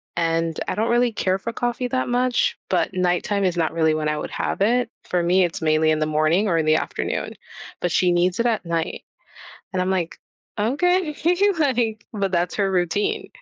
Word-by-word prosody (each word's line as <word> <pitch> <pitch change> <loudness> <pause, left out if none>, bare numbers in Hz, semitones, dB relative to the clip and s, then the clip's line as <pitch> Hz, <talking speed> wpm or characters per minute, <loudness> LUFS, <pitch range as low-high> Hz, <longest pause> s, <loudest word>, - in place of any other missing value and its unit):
and 165 -1 0
I - - -2
don't 220 +2 0
really 240 0 +3
care 190 -3 0
for 230 +4 -5
coffee 245 +1 -2
that 255 -1 -1
much, 245 0 +1
but - - 0
nighttime 185 +2 0
is 180 -2 0
not 160 -2 0
really 160 -1 +2
when 155 0 -1
I 150 - -1
would - - -5
have - - -3
it. 240 +3 +2
For 180 -1 -1
me, 180 +2 +3
it's 175 -1 -2
mainly 155 0 +3
in 155 - +1
the 155 - +1
morning 155 +6 +2
or 170 -4 +2
in 160 - +1
the 155 0 +4
afternoon, - - -3 0.5
but 175 - 0
she 180 +1 +3
needs 175 +2 +1
it 235 - +1
at 220 -6 0
night, 165 -1 -2 0.7
and 185 - -1
I'm 185 - -1
like, 175 -3 -2 0.4
"Okay. 305 - +1 0.4
Like" 240 -8 0
but 200 -2 -1
that's 175 0 0
her 195 -2 +1
routine. 180 +2 0
185 Hz, 200 wpm, -22 LUFS, 165-225 Hz, 0.7 s, the